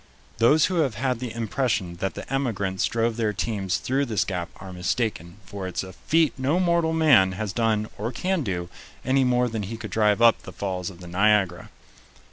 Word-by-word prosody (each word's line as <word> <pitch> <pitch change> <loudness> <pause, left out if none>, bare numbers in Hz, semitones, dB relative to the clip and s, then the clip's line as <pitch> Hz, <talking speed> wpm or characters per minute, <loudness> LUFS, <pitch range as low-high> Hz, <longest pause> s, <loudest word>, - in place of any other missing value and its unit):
Those 145 +7 +5
who 185 - -1
have 140 -9 +1
had 125 +1 -1
the 125 -2 -4
impression 110 -6 -1
that 95 +2 -3
the - - -7
emigrants 100 -8 -1
drove 115 0 0
their 110 -2 0
teams 100 -2 -1
through 135 +2 0
this 110 -3 0
gap 90 -2 -3
are 95 -1 -10
mistaken, 95 0 -2
for 100 -2 -6
it's 90 - -3
a 95 0 -9
feat 160 -1 +1
no 140 +7 +1
mortal 170 -2 +2
man 140 -13 +5
has 105 0 -4
done 110 -1 +1
or 110 +4 -2
can 185 +7 -1
do, 90 -8 -3 0.4
any 135 +1 +3
more 125 -1 +2
than 110 -2 -3
he 110 +3 -5
could 110 -3 -8
drive 105 0 +2
up 115 -1 +5
the - - -10
falls 90 -3 -3
of 90 -2 -13
the 90 - -9
Niagara. 95 -1 +2
110 Hz, 200 wpm, -25 LUFS, 95-130 Hz, 0.4 s, Those